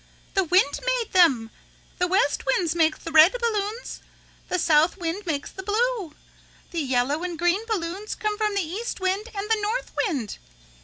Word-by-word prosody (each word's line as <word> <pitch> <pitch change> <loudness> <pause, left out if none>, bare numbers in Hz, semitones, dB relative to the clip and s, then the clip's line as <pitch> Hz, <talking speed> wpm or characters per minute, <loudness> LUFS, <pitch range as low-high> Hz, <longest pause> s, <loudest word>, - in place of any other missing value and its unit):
The 385 - +3
wind 355 -4 +2
made - - -1
them. 265 -12 +4 0.5
The 360 - +2
west 385 +6 +1
wind 340 -4 +1
makes 320 -2 +2
the 330 - -8
red 320 +9 +7
balloons. 445 0 -2 0.5
The 365 - 0
south 320 +1 +3
wind 355 +2 -4
makes 285 -3 -2
the 380 - -8
blue. 420 -4 -1 0.6
The 335 -2 -2
yellow 265 +3 0
and 355 -2 -4
green 350 +5 +1
balloons 395 -1 -3
come 425 -2 -2
from 420 -1 -1
the 385 -5 0
east 410 +8 -4
wind 380 +4 -1
and 400 +1 -3
the 445 -1 +1
north 440 +4 -2 0.2
wind." 265 - -4
370 Hz, 170 wpm, -24 LUFS, 325-425 Hz, 0.6 s, red